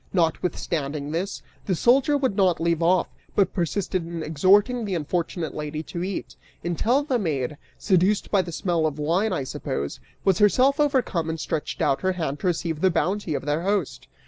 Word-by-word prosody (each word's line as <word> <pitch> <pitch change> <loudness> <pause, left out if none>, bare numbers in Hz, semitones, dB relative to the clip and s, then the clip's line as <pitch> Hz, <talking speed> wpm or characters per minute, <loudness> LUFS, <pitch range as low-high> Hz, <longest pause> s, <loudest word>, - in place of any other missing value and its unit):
Notwithstanding 155 -4 -1
this, 180 +5 -3 0.2
the 185 - +1
soldier 270 - +4
would 260 -7 0
not 185 -3 +3
leave 170 0 +1
off, 175 +1 +3 0.3
but 195 -3 +2
persisted 180 +1 -1
in 165 -1 -5
exhorting 200 - +3
the 200 -3 -2
unfortunate 165 +1 -2
lady 150 +1 -4
to 170 +2 -5
eat, 190 0 -4 0.3
until 225 - +1
the 265 -4 0
maid, 150 - -1 0.2
seduced 190 +1 +2
by 200 - +4
the 180 - -7
smell 170 -2 0
of 150 - -3
the 150 - -4
wine, 185 +8 +1
I 175 -7 -1
suppose, 70 - -4 0.3
was 190 -3 +3
herself 260 +8 +4
overcome 255 - +1
and 160 0 -3
stretched 150 +1 -3
out 135 - +1
her 185 0 +1
hand 155 -5 -3
to - - -2
receive 165 -2 -1
the 190 - +5
bounty 185 -1 0
of 140 - -4
their 150 +2 0
host. 195 -4 -1
175 Hz, 185 wpm, -24 LUFS, 160-200 Hz, 0.3 s, the